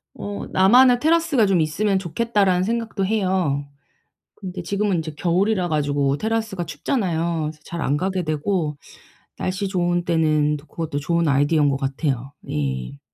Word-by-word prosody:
어 205 0 -5
'나만의 245 +6 +6
테라스가 320 -5 +3
좀 190 -4 +2
있으면 190 +6 +1
좋겠다.'라는 195 0 +1
생각도 225 -2 -1
해요. 185 -9 0 0.7
근데 185 -2 -7
지금은 200 0 0
이제 155 -1 -5
겨울이라 185 +2 +1
가지고 145 -2 +1
테라스가 220 -4 -2
춥잖아요. 165 - -1
그래서 155 0 -5
잘 170 -1 -5
안 140 +2 +1
가게 185 +2 -1
되고. 155 0 -1 0.6
날씨 190 +2 -2
좋은 175 -2 0
때는 155 -3 +2
또 145 - -17
그것도 160 -3 -4
좋은 170 +3 0
아이디어인 145 +2 +3
것 135 - -1
같아요. 135 -1 -2 0.2
예. 70 -2 -3
175 Hz, 345 characters per minute, -22 LUFS, 150-200 Hz, 0.7 s, 나만의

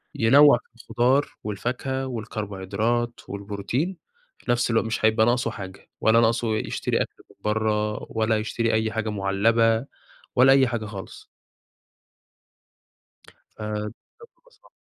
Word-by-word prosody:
ينَّوع 140 +4 +6
في - - -18
الخضار 120 +4 +1
والفاكهة 130 +5 -3
والكربوهيدرات 110 0 -2
والبروتين، 100 - -3 0.4
في - - -3
نفس 120 0 +1
الوق 115 - +2
مش 110 -1 -1
هيبقى 110 0 +4
ناقصه 120 -1 +1
حاجة 95 -2 -10
ولا 110 +1 +5
ناقصه 115 -1 +1
يشتري - - -1
أكل - - -6
من - - -20
برّه 105 0 0
ولا 110 0 +1
يشتري 115 +1 -1
أي 110 0 +1
حاجة 110 0 -2
مُعلّبة 110 +4 +2 0.5
ولا 130 +2 +7
أي 135 -1 +5
حاجة 120 -3 -3
خالص. 100 -2 -9 2.3
أ 105 0 -4
بجد 105 - -5 0.5
مصلحة. - - -24
110 Hz, 125 wpm, -24 LUFS, 105-120 Hz, 2.3 s, ولا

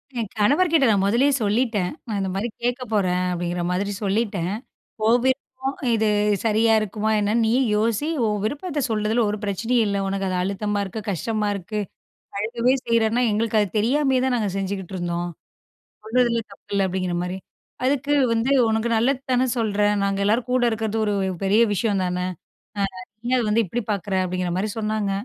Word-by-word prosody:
என் 225 -4 -2
கணவர்க்கிட்ட 305 - +4
நான் 200 -2 +3
மொதல்லயே 245 +8 +3
சொல்லிட்டேன். 210 -3 +1 0.2
நான் 210 -3 -2
இந்த 190 - -1
மாரி 210 +5 -1 0.2
கேட்க 245 +1 0
போறேன் 185 -3 +1
அப்படிங்கிற 175 0 -2
மாதிரி 200 +3 -1
சொல்லிட்டேன். 200 -3 0 0.5
ஓன் 240 +2 +5
விருப்பம். 265 0 -2 0.2
இது 220 -1 +1 0.4
சரியா 225 +1 +3
இருக்குமா 215 +1 -2
என்னன்னு, 215 +3 +1
நீயே 235 +4 +3 0.2
யோசி. 230 +7 0 0.2
ஓவ்விருப்பத்த 285 - -2
சொல்றதில, 220 +2 +1
ஒரு 210 - -3
பிரச்சனையும் 225 +4 +1
இல்ல. 200 -1 -1
ஒனக்கு 195 0 -2
அது 185 - -1
அழுத்தமா 205 +2 -1
இருக்கு, 200 +3 -6
கஷ்டமா 210 +4 -1
இருக்கு. 205 +2 -4 0.6
அழுகவே 235 +4 +1
செய்றேன்னா, 230 +1 +2
எங்களுக்கு 220 +1 +1
அது 205 - +1
தெரியாமயே 265 +4 +2
தான், 255 -2 +1
நாங்க 210 -3 0
செஞ்சுட்டுருந்தோம். 180 -3 -3 0.7
சொல்றதுல 235 +1 +2
தப்பில்ல, 200 0 -2
அப்படிங்கிற 185 -1 -2
மாரி. 180 +1 -4 0.5
அதுக்கு 275 +2 +1 0.2
வந்து, 230 +4 +1 0.2
உனக்கு 220 +1 0
நல்லது 260 +3 +1
தானே 255 +1 +3
சொல்றேன். 210 -2 +1
நாங்க 195 0 0
எல்லாரும் 230 +4 +1
கூட 255 -1 +2
இருக்குறது 220 0 -2
ஒரு 210 - 0 0.3
பெரிய 210 +4 +4
விஷயம் 205 -1 0
தான. 180 0 -2 0.6
ஆ, - - 0 0.4
நீ 240 - -5
ஏன் - - +4
அத 240 - 0
வந்து, 225 +2 +3
இப்டி 235 +7 -3
பார்க்குற 200 -1 -2
அப்படிங்கிற 180 -1 -2
மாரி 205 +3 -1
சொன்னாங்க. 215 -2 -1
215 Hz, 160 wpm, -23 LUFS, 195-235 Hz, 0.7 s, ஓன்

